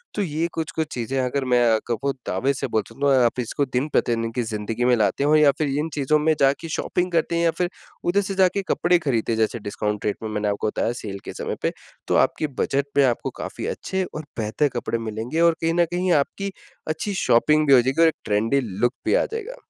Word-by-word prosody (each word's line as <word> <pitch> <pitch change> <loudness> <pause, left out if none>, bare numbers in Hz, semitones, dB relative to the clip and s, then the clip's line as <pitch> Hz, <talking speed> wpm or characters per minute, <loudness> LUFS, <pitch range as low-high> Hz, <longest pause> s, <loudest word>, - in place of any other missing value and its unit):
तो 210 - 0
ये 165 -2 -1
कुछ-कुछ 160 -1 -2
चीज़ें 125 +2 -3
अगर 130 +2 -1
मैं 125 - +5
आपको 120 +4 -1 0.2
दावे 130 +10 +1
से 130 - -3
बोल 110 - 0
सकता 135 +5 -2
हूँ 135 -2 +5
आप 120 - 0
इसको 130 +4 -1
दिन-प्रतिदिन 120 -3 0
की 125 - 0
ज़िंदगी 110 +2 -3
में 125 0 +5
लाते 110 +4 +1
हो 150 +2 +4
या 150 -2 +6
फिर 150 -2 +1
इन 155 +2 -2
चीज़ों 150 +1 +2
में 155 +1 +3
जाके 140 +4 +2
शॉपिंग 180 0 -1
करते 170 0 +1
हैं 170 - +1
या 165 - +4
फिर 180 -1 +1 0.4
उधर 185 +4 +3
से 195 0 -4
जाके 190 +1 +3
कपड़े 175 +1 +3
खरीदते 120 -8 -1
हैं - - -1
जैसे 110 +1 0
डिस्काउंट 105 0 -3
रेट 105 - 0
में 110 - -3
मैंने 105 -1 -2
आपको 100 +1 -1
बताया 110 - -1
सेल 100 -2 -6
के - - -6
समय - - -4
पे - - +1 0.4
तो - - +1
आपके 155 - -3
बजट 140 +1 +1
में 140 - +6
आपको 120 -3 0
काफ़ी - - -5
अच्छे 190 0 -2
और 155 0 -6
बेहतर 110 +7 +1
कपड़े 115 - -2
मिलेंगे 115 +9 -2
और 170 0 +5
कहीं 165 0 +1
न 175 0 +3
कहीं 180 +1 0
आपकी 195 +6 -6 0.4
अच्छी 160 +6 -2
शॉपिंग 150 +6 +4
भी 140 - +6
हो 125 - +8
जाएगी 130 +6 0
और 165 - +7
एक 160 - +1
ट्रेंडी 110 +6 +1
लूक 115 +3 -1
भी - - +2
आ - - +3
जाएगा। 455 +2 -5
140 Hz, 230 wpm, -23 LUFS, 115-165 Hz, 0.4 s, हो